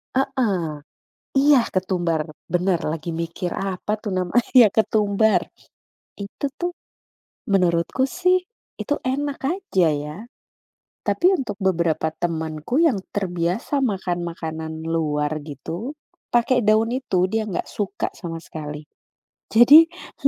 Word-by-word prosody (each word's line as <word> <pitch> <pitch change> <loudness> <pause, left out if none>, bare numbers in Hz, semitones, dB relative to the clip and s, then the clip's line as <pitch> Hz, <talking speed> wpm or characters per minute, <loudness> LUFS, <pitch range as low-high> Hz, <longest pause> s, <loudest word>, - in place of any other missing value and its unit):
Heeh, 240 -11 +1 0.7
iya, 275 -3 +5
ketumbar, 175 -4 -1 0.2
bener, 180 -1 +1
lagi 160 +1 -4
mikir 170 +2 -3
apa 195 +1 -3
tuh 210 -2 -5
namanya 225 +6 +4
ketumbar, 215 -1 +2 0.7
itu 200 +7 -6 0.2
tuh, 350 0 -2 0.7
menurutku 190 +6 +1
sih, 365 0 +2 0.4
itu 290 - -1
enak 280 +2 -1
aja 330 - +1
ya, 150 +1 -4 0.9
tapi - - 0
untuk 210 -7 -4
beberapa 170 -4 +1
temanku 160 - -1
yang 310 -10 +4 0.2
terbiasa 180 - -1
makan-makanan 175 - -3 0.2
luar 155 -2 0
gitu, 170 - -6 0.4
pakai 240 -1 +3
daun 220 +1 +4
itu, 185 -8 0
dia 220 0 -1
gak 195 - -4
suka 205 -1 -3
sama 165 -3 -6
sekali, 150 -2 -7 0.7
jadi 285 +8 +9 0.4
he - - +9
190 Hz, 110 wpm, -22 LUFS, 165-245 Hz, 0.9 s, jadi